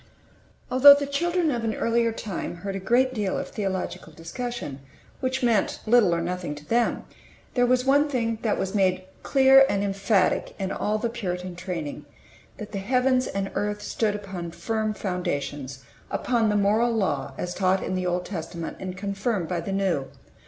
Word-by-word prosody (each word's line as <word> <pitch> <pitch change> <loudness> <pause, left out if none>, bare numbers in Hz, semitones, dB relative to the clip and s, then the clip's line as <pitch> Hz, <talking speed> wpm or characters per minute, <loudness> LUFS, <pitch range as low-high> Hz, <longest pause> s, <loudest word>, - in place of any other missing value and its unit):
ALTHOUGH 280 +3 +9
the 285 - -2
children 335 +3 0
of 240 -3 -2
an 220 -1 -1
earlier 230 0 +1
time 210 -6 -5
heard 195 -1 -3
a - - -2
great 250 +6 +2
deal 205 -5 -1
of - - -4
theological 190 -5 -4
discussion 165 - -6 0.4
which 260 0 -2
meant 230 -4 +2
little 215 -6 +4
or 170 - -1
nothing 175 -3 -3
to 150 0 -12
them, 235 +4 +1 0.5
there 245 -1 +3
was 250 +1 +2
one 285 +2 +4
thing 230 -4 -1
that 220 - 0
was 190 +1 -2
made 185 -2 +2 0.2
clear 270 0 +6
and 200 0 0
emphatic 195 -1 +1
in 190 -1 -3
all 210 +2 -1
the 220 - -1
Puritan 185 -6 -4
training: 175 -5 -5 0.5
that 210 -1 -8
the 200 - -3
heavens 255 +4 +2
and 195 0 -3
earth 210 0 -2
stood 215 -2 0
upon 190 -4 -6
firm 215 +5 -2
foundations 145 -9 -4 0.3
upon 235 -3 +1
the 210 - +2
Moral 210 +4 +3
Law 145 -11 -1
as 180 0 -3
taught 190 0 +1
in - - -3
the 185 -1 -1
Old 180 0 -1
Testament 170 -2 -6
and 185 -1 -6
confirmed 200 -1 -2
by 175 -1 -2
the 195 - -5
New. 185 -9 0
200 Hz, 175 wpm, -25 LUFS, 180-240 Hz, 0.5 s, ALTHOUGH